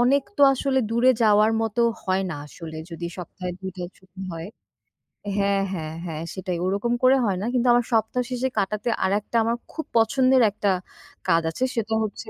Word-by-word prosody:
অনেক 270 +3 +4
তো 285 - +3
আসলে 265 0 0
দূরে 235 +3 +4
যাওয়ার 215 0 +5
মতো 225 +1 -1 0.2
হয় 190 0 +1
না - - -3
আসলে 160 +1 -9
যদি 170 +1 -5
সপ্তাহে 180 +1 -6
২ 190 0 -4
টা 180 - -4
ছুটি 190 0 -15
হয়। 165 0 -6 0.9
হ্যাঁ, 200 0 +2
হ্যাঁ, 160 -3 -4
হ্যাঁ 160 -2 -5
সেটাই 185 -1 -3
ওরকম 200 +5 0
করে 255 +1 +7
হয় 195 -3 0
না। - - -2
কিন্তু 250 0 +2
আমার 240 -1 +3
সপ্তাহ 225 +2 +1
শেষে 255 0 -1
কাটাতে 210 +3 0
আরেকটা 205 +4 -1
আমার 230 +1 +1 0.2
খুব 315 - -4
পছন্দের 255 +3 +4
একটা 205 0 -1 0.6
কাজ 165 -2 +4
আছে, 165 +10 -3
সেটা 225 -1 -1
হচ্ছে, 215 - -5
210 Hz, 180 wpm, -24 LUFS, 185-240 Hz, 0.9 s, করে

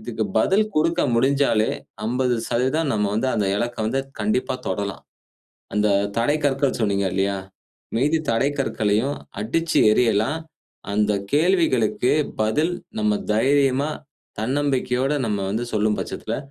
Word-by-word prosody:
இதுக்கு 110 0 -3
பதில் 195 - +3
கொடுக்க 165 +3 +2
முடிஞ்சாலே 130 -3 +2 0.4
50% 125 +5 0
நம்ம 105 -1 +1
வந்து 130 +4 0
அந்த 105 -3 +1
இலக்க 120 +3 -2
வந்து 130 +5 0 0.2
கண்டிப்பா 110 +6 0
தொடலாம். 100 +1 -3 0.7
அந்த 105 0 +2 0.3
தடை 130 +6 +2
கற்கள் 135 -1 +1
சொன்னீங்க 100 -3 +1
இல்லயா! 100 +1 0 0.6
மீதி 150 +6 +2
தடை 115 +5 +2
கற்களையும் 115 +1 0 0.2
அடிச்சு 165 +9 0
எறியலாம், 115 +6 +2 0.5
அந்த 105 0 +2 0.2
கேள்விகளுக்கு 150 - +2 0.3
பதில் 150 +11 +1 0.3
நம்ம 105 -1 +1
தைரியமா, 135 +4 +2 0.5
தன்னம்பிக்கையோட 130 +1 0
நம்ம 105 -2 -1
வந்து 115 +4 -2
சொல்லும் 105 0 +1
பட்சத்தில, - - -4
120 Hz, 115 wpm, -22 LUFS, 110-140 Hz, 0.7 s, பதில்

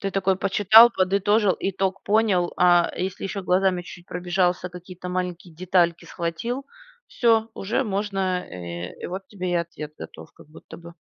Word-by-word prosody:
Ты 195 - -2
такой 190 -1 +1
почитал, 210 +4 +6
подытожил, 200 +2 +2
итог 195 0 -2
понял, 200 -5 +2
а, 175 -1 +4
если, 190 +2 -4
ещё, 195 0 -4
глазами 180 0 +1
чуть 175 0 -12
пробежался, 180 0 -1
какие-то 180 0 -10
маленькие 180 -1 -4
детальки 175 -1 +1
схватил. 190 +11 -4 0.4
Всё! 225 -2 +2
Уже 225 +7 -1
можно 200 -1 -3 0.3
э, 85 0 -7
и - - -3
вот 190 +1 -6
тебе 185 -3 -6
и 175 - 0
ответ 155 -3 -8
готов, - - -11
как - - -18
будто 155 - -13
бы. 170 0 -12
185 Hz, 155 wpm, -24 LUFS, 175-195 Hz, 0.4 s, почитал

